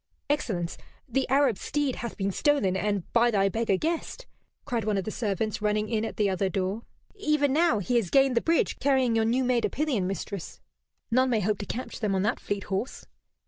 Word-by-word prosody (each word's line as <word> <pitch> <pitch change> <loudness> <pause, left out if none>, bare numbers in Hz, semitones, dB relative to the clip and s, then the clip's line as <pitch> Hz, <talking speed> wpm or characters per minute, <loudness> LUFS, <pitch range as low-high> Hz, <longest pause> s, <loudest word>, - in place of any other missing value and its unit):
"Excellence, 185 - -2 0.3
the 265 +1 -1
Arab 270 -6 +3
steed 290 -3 -1
hath 235 -2 -5
been 195 0 -1
stolen, 280 -6 +2
and 205 -1 0
by 240 0 +5
thy 195 -3 +2
beggar 220 -2 +1
guest," 335 - -3 0.4
cried 235 -2 -1
one 210 -1 0
of 195 - -1
the 215 - -4
servants, 215 -1 -2
running 210 0 0
in 220 -2 0
at 225 - -5
the 210 - +2
other 190 0 0
door. 190 +3 -2 0.3
"Even 300 -8 +1
now 320 -6 +3
he 240 +5 0
has 215 -7 0
gained 270 +1 +4
the 235 - +3
bridge, 330 0 +1
carrying 265 -4 +2
your 225 0 +2
new 245 +4 +2
maid 245 -2 +1
a - - +2
pillion, 265 -10 -1
mistress. 195 -1 -5 0.5
None 255 +2 +3
may 225 -3 +2
hope 205 +1 0
to 205 - -5
catch 255 - -5
them 210 -3 0
on 190 - +1
that 215 +4 0
fleet 205 -1 -3
horse." 195 +6 -4
225 Hz, 210 wpm, -27 LUFS, 200-260 Hz, 0.5 s, by